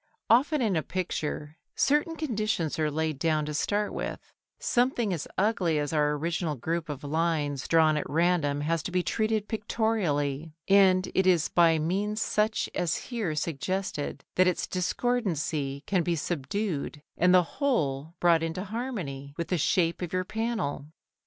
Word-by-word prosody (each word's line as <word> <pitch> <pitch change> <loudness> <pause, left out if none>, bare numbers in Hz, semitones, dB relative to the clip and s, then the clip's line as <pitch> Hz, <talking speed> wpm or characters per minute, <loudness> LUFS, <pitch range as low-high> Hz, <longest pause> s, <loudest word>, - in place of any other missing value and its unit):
Often 270 +4 +4
in 205 -5 +1
a 160 - +2
picture 155 -4 -4 0.2
certain 295 +3 +2
conditions 215 - -1
are 155 -1 +2
laid 155 -1 -2
down 155 -1 +1
to 150 - -4
start 205 +7 0
with; - - -4 0.4
something 240 -4 +1
as 160 -4 -4
ugly 185 -6 +2
as 145 +1 -1
our 150 -1 +2
original 165 +1 -1
group 165 +5 -3
of 145 -1 -5
lines 150 -2 -1
drawn 160 -2 +4
at 150 - -3
random 160 -3 +1
has 165 +2 0
to 180 - -5
be 180 0 +1
treated 215 0 0
pictorially, 165 -10 -1
and 190 -1 +5
it 190 0 +2
is 175 -4 +3
by 165 -2 +4
means 200 +7 -1
such 215 0 +1
as 175 -2 0 0.2
here 210 -10 -1
suggested 165 +1 -3
that 185 0 +5
its 180 - +1
discordancy 170 - -1
can 190 -3 +1
be 170 0 0
subdued 160 -1 -3
and 180 +1 +4
the 180 -1 +6 0.2
whole 160 - 0
brought 170 -2 +4
into 165 +3 -3
harmony 190 - -5
with 170 - -3
the 180 - +1
shape 170 +2 +1
of 175 -2 -3
your 185 0 0
panel. 215 -11 -2
170 Hz, 160 wpm, -28 LUFS, 150-205 Hz, 0.4 s, the